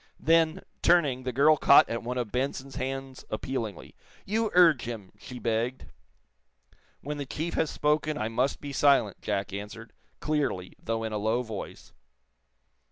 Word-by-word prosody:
Then, 165 +2 +2 0.2
turning, 145 -8 +3
the 130 - -1
girl 150 +5 +5
caught 140 - +7
at 115 0 -3
one 125 +2 -4
of 120 -4 -3
Benson's 135 +1 -3
hands 135 0 -5
appealingly. 110 -2 -4 0.3
"You 220 +2 0
urge 165 -8 +6
him!" 110 -5 -7
she 125 +2 -9
begged. 120 +2 -2 1.2
"When 150 +1 -5
the 140 - -3
chief 160 +5 -4
has 160 - 0
spoken 150 0 0
I 110 - -1
must 125 +4 0
be 145 -1 -6
silent," 135 -8 +3
Jack 100 -2 -2
answered, 105 +3 -8 0.3
clearly, 140 -12 -1
though 115 0 -2
in 110 -1 -3
a 105 - -1
low 110 +4 0
voice. 110 -4 -8
130 Hz, 155 wpm, -28 LUFS, 115-150 Hz, 1.2 s, caught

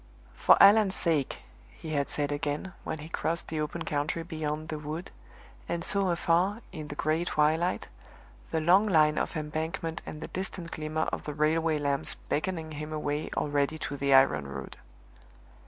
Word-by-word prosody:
"For - - +5
Allan's 200 -2 +7
sake!" 155 -6 0 0.3
he 160 - -9
had 140 -2 0
said 145 -1 -1
again, 145 +5 -3
when - - -3
he 150 +1 -8
crossed 170 0 -2
the 155 -1 -2
open 165 +2 -3
country 150 +2 -1
beyond 155 -1 -4
the 155 - -3
wood, 155 +4 -6 0.6
and 170 0 -2
saw 200 0 +2
afar, 175 +5 +1
in 155 -1 -7
the 145 - -7
gray 155 +3 +1
twilight, 160 +2 +1 0.6
the 160 - 0
long 185 +6 +5
line 155 -5 +4
of - - -2
embankment 160 +2 -3
and 150 - -6
the - - -6
distant 185 -2 -4
glimmer 155 0 -2
of - - -4
the 150 - -4
railway 155 +1 +2
lamps 140 -1 +1
beckoning 160 0 -3
him 150 +1 -6
away 150 0 -2
already 145 +1 0
to 145 - -4
the 140 0 0
iron 135 - +5
road. 70 -1 -7
155 Hz, 170 wpm, -29 LUFS, 150-170 Hz, 0.6 s, Allan's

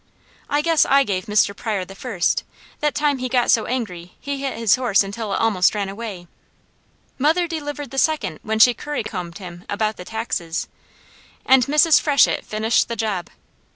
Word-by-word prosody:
I 290 +1 +1
guess 330 -2 +4
I 275 +1 +5
gave 195 -3 -3
Mr. 210 -1 +2
Pryor 205 -5 -3
the 195 - -11
first, 195 -3 -1 0.4
that 295 -1 0
time 290 -2 +1
he 255 0 -3
got 245 -1 +2
so 225 - +2
angry 180 -9 -4
he 280 -1 -4
hit 275 -1 -3
his 225 -3 +3
horse 240 -6 +2
until 200 +2 -5
it - - 0
almost 210 -4 +2
ran 200 -2 -2
away. 200 -3 -7 0.9
Mother 325 +6 +2
delivered 290 -4 -5
the 270 - -1
second 235 - 0
when 220 +1 -2
she 240 +2 +7
curry 295 0 -4
combed 180 -5 -6
him 175 -3 -10
about 215 +1 -1
the 180 - -9
taxes, 180 -7 -3 0.8
and 260 -2 +5
Mrs. 300 +2 +5
Freshett 285 -4 +3
finished 220 +1 +1
the 235 - -4
job. 210 -6 -2
225 Hz, 180 wpm, -21 LUFS, 195-275 Hz, 0.9 s, she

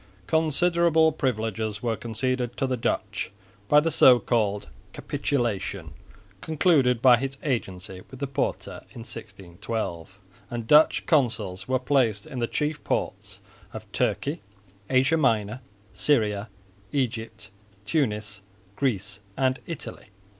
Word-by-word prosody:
Considerable 160 - +3
privileges 110 -6 -2
were 115 -2 0
conceded 120 +2 -2
to 135 - +1
the 130 -1 0
Dutch 110 -3 -2 0.4
by 150 - +7
the 165 +2 0
so 130 -4 +7
called 105 -5 0 0.3
"capitulation" 100 - -2 0.5
concluded 140 -7 +2
by 125 -2 +8
his 135 +2 -4
agency 95 - -3
with 130 - -11
the 140 - -1
Porte 135 0 -2
in 115 - -10
1612; 95 -3 -6 0.3
and 120 -1 -4
Dutch 150 +6 +5
consuls 110 - +1
were 130 0 +2
placed 125 -6 +1
in 130 - -6
the 115 - 0
chief 150 +3 -2
ports 100 0 -3 0.3
of 110 -2 -9
Turkey, 125 - -1 0.5
Asia 135 +5 +3
Minor, 115 -4 +1 0.3
Syria, 105 -4 +1 0.4
Egypt, 115 -6 -3 0.3
Tunis, 105 -5 -1 0.4
Greece 105 -6 -1 0.2
and 130 -1 +1
Italy. 165 -4 -7
120 Hz, 120 wpm, -26 LUFS, 105-135 Hz, 0.5 s, by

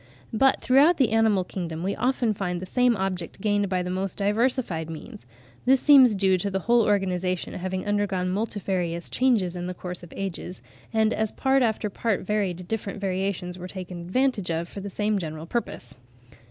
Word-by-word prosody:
But 265 +5 +4
throughout 285 +7 +5
the 255 -6 +2
animal 220 -4 +3
kingdom 170 -3 -5
we 195 +2 -1
often 245 -1 +1
find 180 -3 -3
the 185 - -6
same 245 +3 +2
object 185 -3 -3
gained 205 -1 +1
by 185 -1 0
the 180 - -3
most 190 +1 -3
diversified 210 - 0
means; 150 -6 -9 0.4
this 265 +1 +5
seems 260 -7 +7
due 190 -1 +2
to 200 - -1
the 190 0 -2
whole 235 +4 +4
organisation 185 -3 0
having 185 +1 -3
undergone 205 -3 0
multifarious 185 -5 -2
changes 220 -9 +2
in 175 0 -4
the 180 - -5
course 180 0 -6
of 175 - -12
ages, 185 -1 -5 0.3
and 220 0 +2
as 220 0 -1
part 270 0 +2
after 220 -3 +1
part 210 0 -1
varied 185 -3 -2
different 210 -2 -4
variations 185 -2 -2
were 180 - -6
taken 180 -2 -7
advantage 210 +1 0
of 165 +1 -1
for 200 - -8
the 200 +1 -6
same 210 +1 0
general 155 -2 -6
purpose. 170 - -4
195 Hz, 180 wpm, -25 LUFS, 180-220 Hz, 0.4 s, seems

